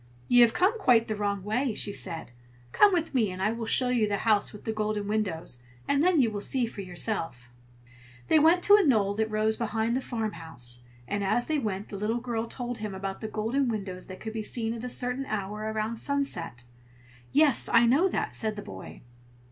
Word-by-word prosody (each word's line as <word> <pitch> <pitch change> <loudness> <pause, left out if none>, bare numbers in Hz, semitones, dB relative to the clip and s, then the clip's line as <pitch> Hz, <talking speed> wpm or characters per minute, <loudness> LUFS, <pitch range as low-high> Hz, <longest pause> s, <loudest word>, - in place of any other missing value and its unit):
"You 245 0 +6
have 235 -1 +6
come 390 +6 +2
quite 240 - +4
the 215 - -2
wrong 200 -2 -2
way!" 225 +3 -1
she 205 - 0
said. 165 -9 -4 0.4
"Come 415 - +6
with 335 -4 -1
me, 230 -6 +2
and 185 0 -7
I 205 +3 +1
will 230 0 -4
show 250 +2 +3
you 235 -4 +2
the 205 -1 0
house 215 -2 +3
with 210 - -12
the 220 - -2
golden 215 -1 -2
windows, 185 - -2 0.3
and 280 0 +2
then 350 -1 +4
you 235 -4 +3
will 205 -1 -4
see 255 +3 +1
for 220 -3 -7
yourself." 175 - -4 0.8
They 315 - +5
went 330 +4 +4
to 405 - +8
a 415 - +3
knoll 215 - +3
that 220 +1 -1
rose 215 0 0
behind 230 0 -1
the 260 - 0
farmhouse, 165 - -4 0.3
and 205 0 -2
as 240 +5 +1
they 310 -1 0
went 205 -5 -3
the 200 - -6
little 215 +4 -1
girl 235 -2 -3
told 245 -1 -5
him 205 -3 -5
that 195 0 -4
the 220 - -3
golden 225 +6 -1
windows 190 -5 -5
could 185 - -8
only 220 - -4
be 220 0 -4
seen 225 +1 -2
at 230 0 -7
a 250 - -4
certain 250 +2 -1
hour, 210 +1 -3
about 220 +1 -2
sunset. 180 - -2 0.7
"Yes, 290 -4 +3
I 235 0 +6
know 280 +11 +4
that!" - - -2
said 215 -1 -1
the 205 - -7
boy. 95 0 -10
220 Hz, 215 wpm, -28 LUFS, 205-245 Hz, 0.8 s, to